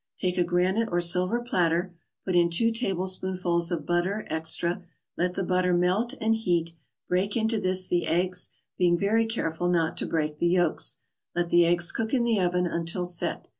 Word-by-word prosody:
Take 180 -1 -1
a - - +4
granite 185 +6 0
or 175 - +1
silver 180 +6 +2
platter, 175 -5 0 0.3
put 185 - -1
in 170 -1 +4
two 230 +8 +3
tablespoonfuls 185 -5 0
of 160 -4 -3
butter 180 +5 -1
extra, 165 +3 -1 0.3
let 180 +1 -1
the 195 - -2
butter 180 0 +1
melt 185 +7 0
and 225 +1 +1
heat; 175 -7 -1 0.3
break 190 +5 0
into 220 0 0
this 185 -1 +2
the 175 -1 0
eggs, 180 +1 +1 0.3
being 175 -1 +3
very 220 +4 +1
careful 175 -6 -2
not 165 -2 0
to - - -1
break 150 -2 -2
the 170 - +2
yolks. 175 -2 +1 0.4
Let 175 0 -1
the 175 -1 +5
eggs 175 0 +3
cook 225 +3 -2
in 245 - +1
the 230 -3 +1
oven 180 0 +1
until 170 +1 -2
"set." 175 -1 0
180 Hz, 180 wpm, -26 LUFS, 175-195 Hz, 0.4 s, the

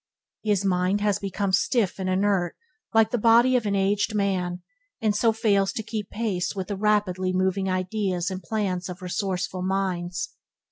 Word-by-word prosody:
His 205 -2 +1
mind 185 +1 +2
has 205 -2 +1
become 195 0 -2
stiff 205 -2 +1
and 185 -1 -1
inert 190 -2 +1 0.4
like 225 0 +4
the 245 - 0
body 235 +3 +5
of 235 -4 +1
an 200 - +1
aged 200 +2 +1
man, 185 -3 -1 0.4
and 215 -2 +1
so 225 +2 +3
fails 205 -3 +2
to 220 - -3
keep 215 -2 -5
pace 205 -5 -2
with 190 0 -4
the 200 - -1
rapidly 195 -3 +1
moving 190 +1 +1
ideas 185 -1 -1
and 185 0 -5
plans 185 -1 -2
of 180 +1 -8
resourceful 185 0 -2
minds. 180 -2 -2
195 Hz, 170 wpm, -25 LUFS, 185-210 Hz, 0.4 s, body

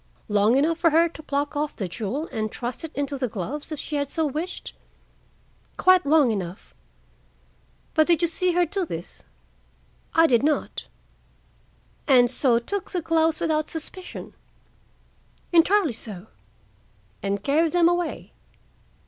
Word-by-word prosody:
"Long 210 +3 +3
enough 320 +4 +1
for 340 - +4
her 330 +2 +4
to 320 - -11
pluck 290 0 -2
off 295 0 -2
the 195 - -3
jewel 225 - -3
and 215 -1 -2
thrust 240 +4 -5
it 325 - -6
into 280 -1 -2
the 255 - 0
gloves, 240 - -5
if 305 - -4
she 300 - -3
had 285 -1 -2
so 320 +1 -1
wished?" 310 +5 -4 1.0
"Quite 370 -3 +4
long 290 -5 +5
enough." 185 - -5 1.2
"But 310 +1 +3
you 340 - +5
did 340 - +2
not 335 - -2
see 360 +1 +1
her 350 0 +3
do 385 +4 -1
this?" 170 - -7 0.9
"I 330 - +6
did 240 -7 +4
not." 300 +1 -1 1.2
"And 250 -3 +5
so 250 -2 +3
took 380 +11 -4
the 355 - -2
gloves 325 -1 +2
without 310 -2 0
suspicion?" 355 +3 -6 1.2
"Entirely 345 - +4
so." 205 -4 -8 1.0
"And 200 0 -2
carried 315 +4 +2
them 345 -1 +5
away?" 350 0 -2
300 Hz, 150 wpm, -24 LUFS, 245-330 Hz, 1.2 s, I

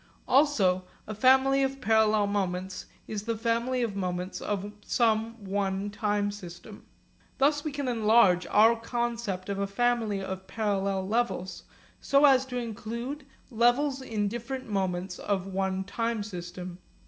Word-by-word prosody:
Also 230 -10 +3 0.2
a 215 - -5
family 265 +4 +4
of 270 0 -1
parallel 220 -3 +3
moments 190 -2 -3 0.2
is 210 -2 -4
the 225 +1 -3
family 235 +3 0
of 215 -4 -2
moments 180 -1 -3
of 205 0 -3
some 225 -1 0
one 195 +1 -1
time 205 -1 0
system. 200 +1 -11 0.5
Thus 290 +2 +2
we 305 - -3
can 280 -1 -3
enlarge 215 -6 +4
our 220 +3 +5
concept 230 -5 -3
of 200 -1 -3
a 200 - 0
family 225 -1 0
of 190 0 -6
parallel 195 -3 -1
levels 220 -4 -2 0.3
so 280 +1 +4
as 265 -2 +5
to 250 -1 -4
include 235 +5 -5 0.2
levels 255 +4 +2
in 215 -5 -2
different 240 +4 -5
moments 185 -3 -2
of 195 -2 -1
one 190 0 -2
time 230 +2 -2
system. 180 -2 -7
215 Hz, 140 wpm, -28 LUFS, 195-240 Hz, 0.5 s, our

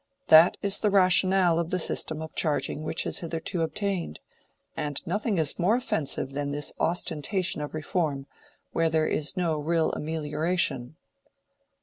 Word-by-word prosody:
That 160 +2 +7
is 200 0 +1
the 210 - +1
rationale 185 -2 +4
of 170 -1 -2
the 185 - 0
system 160 -2 -1
of 160 - -9
charging 150 -1 -1
which 160 +1 -1
has - - -2
hitherto 165 +1 -3
obtained; 175 - -3 0.6
and 145 -2 -3
nothing 205 +3 -1
is 155 0 0
more 185 +6 +3
offensive 155 - -1
than 145 0 -2
this 145 +1 -2
ostentation 175 +2 -1
of 150 +1 -6
reform, 150 -3 -2 0.5
where 165 0 +1
there 160 -1 +1
is 155 +5 -1
no 165 -4 0
real 165 +2 +1
amelioration." 155 -3 -1
160 Hz, 145 wpm, -26 LUFS, 150-180 Hz, 0.6 s, That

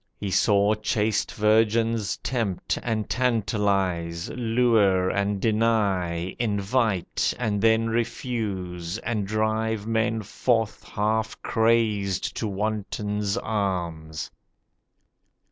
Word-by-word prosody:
He 100 -2 -4
saw 100 +2 +3
chaste 105 0 0
virgins 110 0 +2
tempt 110 -8 -1
and 110 -3 -2
tantalise, 100 -8 0
Lure 110 -6 +2
and 100 0 0
deny, 100 -6 +1
invite—and 105 -1 0
then 115 0 +4
refuse, 105 -7 -3
And 110 -4 -2
drive 110 0 0
men 110 0 0
forth 115 +1 0
half 110 +1 -1
crazed 110 -4 +1
to 110 - -1
wantons' 105 0 -2
arms. 85 -7 -3
105 Hz, 85 wpm, -25 LUFS, 100-115 Hz, -, then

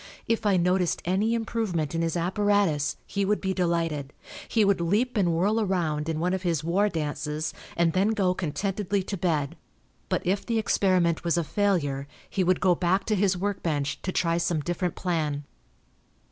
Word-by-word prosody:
If 225 -1 +1
I 195 -2 +4
noticed 180 0 +1
any 200 +6 +1
improvement 220 -10 -2
in 165 - 0
his 165 0 0
apparatus 185 -4 +1
he 200 - -2
would 205 +2 +1
be 190 -1 -1
delighted. 165 -6 -1 0.3
He 220 -3 +3
would 200 -3 +2
leap 210 +10 +1
and 190 -5 +2
whirl 200 +7 +2
around 165 -6 0
in 160 -1 -1
one 180 +3 0
of 190 - -1
his 170 -4 0
'war 190 +6 +2
dances,' 150 -1 -3 0.2
and 170 -1 +3
then 190 +2 +3
go 200 -5 +2
contentedly 195 +3 -2
to 200 - -4
bed. 160 -6 -1 0.5
But - - -1
if 195 +3 +1
the 230 -1 -1
experiment 185 -6 +2
was 170 0 +1
a 170 - +2
failure 150 -7 0 0.2
he 190 - 0
would 185 +1 +2
go 185 -2 +5
back 185 +3 +1
to 215 - +1
his 190 -2 +2
work 200 +2 -2
bench 145 -4 -1
to 185 - -2
try 170 -2 +1
some 170 -2 0
different 175 +2 -2
plan." 155 -5 -1
180 Hz, 185 wpm, -26 LUFS, 165-200 Hz, 0.5 s, go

